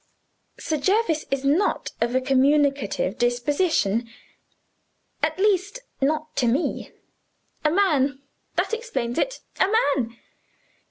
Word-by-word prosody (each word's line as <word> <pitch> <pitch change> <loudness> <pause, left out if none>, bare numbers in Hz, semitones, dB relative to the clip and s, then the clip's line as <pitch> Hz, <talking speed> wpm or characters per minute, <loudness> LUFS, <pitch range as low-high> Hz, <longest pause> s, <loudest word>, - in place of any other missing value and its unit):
Sir 310 - -1
Jervis 355 0 +1
is 275 0 -2
not 320 +9 +1
of 235 +2 0
a 260 - +3
communicative 275 -6 +1
disposition. 240 - +1 1.1
At 310 +2 0
least, 400 +2 +1 0.2
not 310 +3 -1
to 250 - +2
me. 265 +9 -1 0.7
A 305 - +4
man 295 -7 +2 0.4
that - - 0
explains 270 - -2
it - - -1 0.2
a 375 - +4 0.3
man! 230 -3 -3
285 Hz, 110 wpm, -24 LUFS, 255-350 Hz, 1.1 s, A